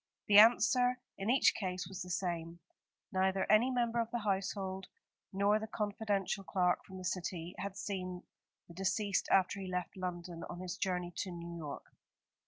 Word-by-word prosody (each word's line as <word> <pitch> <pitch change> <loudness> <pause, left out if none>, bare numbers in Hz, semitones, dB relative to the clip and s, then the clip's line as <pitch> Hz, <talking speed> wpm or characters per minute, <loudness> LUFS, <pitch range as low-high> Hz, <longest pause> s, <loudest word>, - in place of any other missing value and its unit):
The 205 0 +9
answer 245 +3 +6 0.2
in 195 +3 -2
each 260 +2 +5
case 185 -3 -3
was 190 0 -7
the 180 - -6
same. 170 -2 -2 0.5
Neither 190 0 +1
any 220 +4 +5
member 240 -2 +1
of 230 -1 0
the 240 - -2
household, 190 -1 -2 0.4
nor 200 +2 +3
the 220 - -5
confidential 205 -2 -1
clerk 180 -2 +1
from 190 - -9
the 185 - -7
City, 175 -1 -3
had 195 0 -4
seen 185 -3 -4 0.4
the 170 - -12
deceased 195 +2 0
after 195 +1 +3
he 190 - -5
left 180 0 -3
London 175 -2 -5
on 175 - -6
his 185 0 -4
journey 180 -2 -2
to 190 - -2
New 170 -1 -7
York. 150 -4 -6
190 Hz, 170 wpm, -34 LUFS, 180-205 Hz, 0.5 s, The